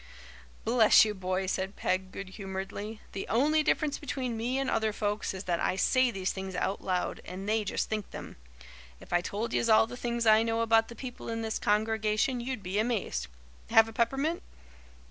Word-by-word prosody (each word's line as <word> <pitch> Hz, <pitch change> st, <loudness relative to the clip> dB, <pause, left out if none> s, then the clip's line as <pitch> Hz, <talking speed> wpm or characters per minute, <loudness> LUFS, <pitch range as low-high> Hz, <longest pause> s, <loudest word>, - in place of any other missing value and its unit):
"Bless 225 Hz, -1 st, +6 dB
you, 215 Hz, -, -2 dB
boy," 185 Hz, -1 st, -2 dB
said 190 Hz, +1 st, -2 dB
Peg 185 Hz, 0 st, -1 dB
good 195 Hz, -1 st, -7 dB
humouredly, 195 Hz, +2 st, -6 dB
"the 195 Hz, -, -5 dB
only 295 Hz, +7 st, +3 dB
difference 300 Hz, -1 st, 0 dB
between 255 Hz, -4 st, -3 dB
me 240 Hz, +4 st, -1 dB
and 270 Hz, 0 st, -1 dB
other 220 Hz, -3 st, +1 dB
folks 210 Hz, 0 st, -2 dB
is 190 Hz, 0 st, -6 dB
that 175 Hz, -3 st, -1 dB
I -, -, +1 dB
say 255 Hz, +6 st, +3 dB
these 190 Hz, -4 st, -2 dB
things 190 Hz, -1 st, -6 dB
out 195 Hz, +2 st, -1 dB
loud 185 Hz, -1 st, -2 dB
and 190 Hz, +2 st, -7 dB
they 215 Hz, 0 st, +1 dB
just 205 Hz, -, -2 dB
think 215 Hz, -2 st, -3 dB
them. -, -, -9 dB, 0.6 s
If -, -, -10 dB
I 175 Hz, -, +4 dB
told 215 Hz, +6 st, -3 dB
yez 230 Hz, -, +1 dB
all 220 Hz, 0 st, +6 dB
the 235 Hz, -, -8 dB
things 235 Hz, -1 st, -2 dB
I 220 Hz, 0 st, +6 dB
know 225 Hz, 0 st, 0 dB
about 225 Hz, 0 st, +4 dB
the 235 Hz, -, -10 dB
people 245 Hz, 0 st, -7 dB
in 225 Hz, 0 st, -3 dB
this 220 Hz, -1 st, -2 dB
congregation 220 Hz, +3 st, +1 dB
you'd 240 Hz, -4 st, -4 dB
be 190 Hz, +3 st, -1 dB
amazed. 215 Hz, -, -1 dB, 0.4 s
Have 225 Hz, -1 st, +6 dB
a 225 Hz, -, -9 dB
peppermint?" 270 Hz, +9 st, 0 dB
220 Hz, 195 wpm, -29 LUFS, 195-235 Hz, 0.6 s, Bless